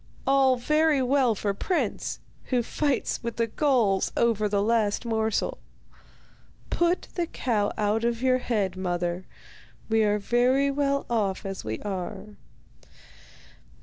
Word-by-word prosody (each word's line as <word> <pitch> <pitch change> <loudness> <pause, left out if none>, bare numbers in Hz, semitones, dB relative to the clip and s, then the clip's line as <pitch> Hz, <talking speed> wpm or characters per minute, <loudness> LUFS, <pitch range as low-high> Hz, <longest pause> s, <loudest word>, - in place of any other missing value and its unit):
All 270 -1 +4
very 305 +2 +2
well 255 -3 +2
for 200 0 -1
Prince, 355 - -2 0.3
who 250 -2 0
fights 285 +3 -1
with 235 0 -4
the 230 - +1
gulls 230 -6 +1
over 220 -3 +2
the 200 0 +1
last 220 0 +1
morsel. 220 -2 -1 1.1
Put 345 +1 +1
the 345 -2 -1
cow 220 -9 -1
out 215 +1 +1
of 235 -1 0
your 255 -1 +3
head, 210 -7 -1
mother, 175 -1 -2 0.6
we 225 0 +3
are 210 0 +2
very 250 +6 +2
well 280 0 0
off 205 -6 -1
as 195 0 -5
we 110 0 -3
are. 195 +1 -5
230 Hz, 130 wpm, -26 LUFS, 205-265 Hz, 1.1 s, All